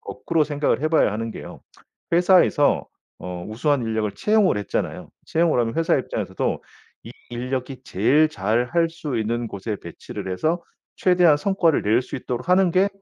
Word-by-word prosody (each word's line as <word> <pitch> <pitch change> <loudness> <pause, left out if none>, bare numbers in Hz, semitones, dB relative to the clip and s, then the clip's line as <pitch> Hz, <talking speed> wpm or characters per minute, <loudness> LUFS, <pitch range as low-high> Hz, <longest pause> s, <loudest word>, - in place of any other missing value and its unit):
거꾸로 165 -2 -1
생각을 145 -2 0
해 155 - +2
봐야 155 -10 +3
하는 115 +1 -3
게요. - - -9 0.5
회사에서 175 -4 +4 0.3
어 90 -1 -6
우수한 130 +5 0
인력을 110 -2 -1
채용을 210 - +2
했잖아요. 105 - -3 0.2
채용을 165 -5 +2
하면 115 -1 -1
회사 165 0 +2
입장에서도 - - -3 0.4
이 - - -9 0.2
인력이 130 +2 -4
제일 140 +12 +3
잘할 125 - 0
수 160 -6 -5
있는 115 +2 -1
곳에 105 +2 -5
배치를 85 +2 -8
해서 160 - 0 0.4
최대한 180 -4 +4
성과를 170 -2 +1
낼 110 +4 +2
수 - - -7
있도록 125 +3 -5
하는 185 0 +4
게 190 +3 +3
140 Hz, 345 characters per minute, -23 LUFS, 115-165 Hz, 0.5 s, 회사에서